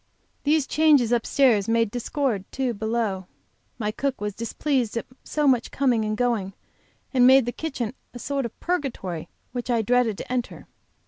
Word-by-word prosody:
These 300 -1 +3
changes 290 -7 +4
upstairs 235 -3 +3
made 230 -2 +2
discord; 245 -4 -1
too, 260 -3 -1
below. 220 -3 -2 0.5
My 215 -3 -1
cook 270 +4 -2
was 210 0 -3
displeased 235 +1 -1
at - - -2 0.2
so 300 -1 -1
much 250 -3 +3
coming 250 -5 +1
and 215 0 -2
going, 230 -6 0 0.6
and 250 -1 +6
made 265 -1 +7
the 245 - -1
kitchen 250 -6 -4 0.2
a - - -9
sort 275 0 -2
of - - -14
a - - -24
purgatory 255 - -2 0.2
which 245 0 -5
I 235 -2 +2
dreaded 240 -2 +2
to - - -7
enter. 245 -1 -3
245 Hz, 170 wpm, -25 LUFS, 220-270 Hz, 0.6 s, made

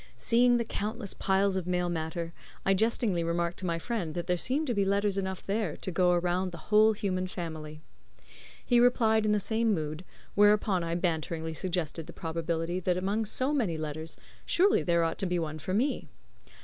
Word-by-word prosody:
Seeing 240 +1 +4
the 235 - -1
countless 215 -1 -3
piles 195 0 +1
of 185 -2 -2
mail 180 -1 0
matter, 165 0 -3 0.3
I 195 - +4
jestingly 210 -3 +1
remarked 170 +1 -1
to 185 - -3
my 170 -1 0
friend 175 -4 -3
that 175 -1 -3
there 180 0 +1
seemed 265 - 0
to 250 - -1
be 200 -2 +2
letters 200 0 +1
enough 190 -1 -3
there 200 -5 -1
to 185 - -5
go 180 0 +3
around 180 +1 0
the 170 - -8
whole 215 +1 +6
human 185 -3 -2
family. 155 -4 -6 0.8
He 245 - +4
replied 220 -3 +4
in - - +3
the 210 - +3
same 220 +1 +1
mood, 155 +1 -4 0.3
whereupon 205 -3 +4
I 165 0 -2
banteringly 160 -2 -2
suggested 165 -1 -2
the - - -9
probability 165 +1 -2
that 180 0 0
among 200 +4 0
so 260 +7 0
many 215 - 0
letters, 155 +1 -5 0.3
surely 400 +4 +3
there 170 -1 +2
ought 165 0 -2
to 195 - 0
be 180 0 0
one 155 -2 -3
for 185 +5 -3
me. 255 +4 0
185 Hz, 190 wpm, -29 LUFS, 170-210 Hz, 0.8 s, whole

